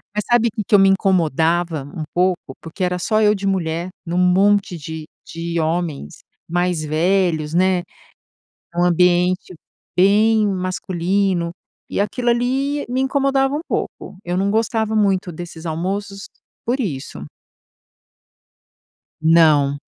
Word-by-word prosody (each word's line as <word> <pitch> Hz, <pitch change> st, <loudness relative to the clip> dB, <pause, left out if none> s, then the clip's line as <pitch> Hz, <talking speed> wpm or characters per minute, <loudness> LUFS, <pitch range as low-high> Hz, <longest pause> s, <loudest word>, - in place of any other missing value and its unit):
Mas 210 Hz, -, 0 dB
sabe 235 Hz, -1 st, +4 dB
que 215 Hz, 0 st, -4 dB
que 210 Hz, -, +3 dB
eu -, -, +7 dB
me 195 Hz, 0 st, +6 dB
incomodava 170 Hz, -4 st, +1 dB
um 160 Hz, -, -4 dB
pouco? 180 Hz, -6 st, 0 dB
Porque 165 Hz, +4 st, -6 dB
era 180 Hz, 0 st, 0 dB
só 215 Hz, +5 st, +1 dB
eu 210 Hz, -1 st, +5 dB
de 200 Hz, -1 st, -3 dB
mulher 170 Hz, -2 st, -1 dB, 0.2 s
num 170 Hz, +1 st, -2 dB
monte 190 Hz, +1 st, +3 dB
de 160 Hz, 0 st, -7 dB, 0.2 s
de 170 Hz, 0 st, -4 dB
homens 160 Hz, -, -2 dB, 0.3 s
mais 175 Hz, -1 st, 0 dB
velhos, 160 Hz, 0 st, +1 dB
né, 180 Hz, 0 st, +2 dB, 0.9 s
um 175 Hz, -, +2 dB
ambiente 180 Hz, +1 st, +2 dB, 0.4 s
bem 210 Hz, +3 st, +4 dB
masculino. 185 Hz, -1 st, -1 dB, 0.4 s
E -, -, -3 dB
aquilo 240 Hz, +4 st, 0 dB
ali 265 Hz, +4 st, 0 dB
me 255 Hz, +2 st, -1 dB
incomodava 270 Hz, 0 st, +1 dB
um 300 Hz, -, -2 dB
pouco. -, -, -4 dB
Eu 175 Hz, +1 st, -2 dB
não 195 Hz, +1 st, +1 dB
gostava 220 Hz, 0 st, 0 dB
muito 195 Hz, -3 st, +1 dB
desses 165 Hz, 0 st, -9 dB
almoços 195 Hz, +5 st, -4 dB, 0.4 s
por 245 Hz, +4 st, 0 dB
isso. 135 Hz, -, -4 dB, 2.0 s
Não. 155 Hz, -3 st, +4 dB
185 Hz, 130 wpm, -20 LUFS, 170-205 Hz, 2.0 s, eu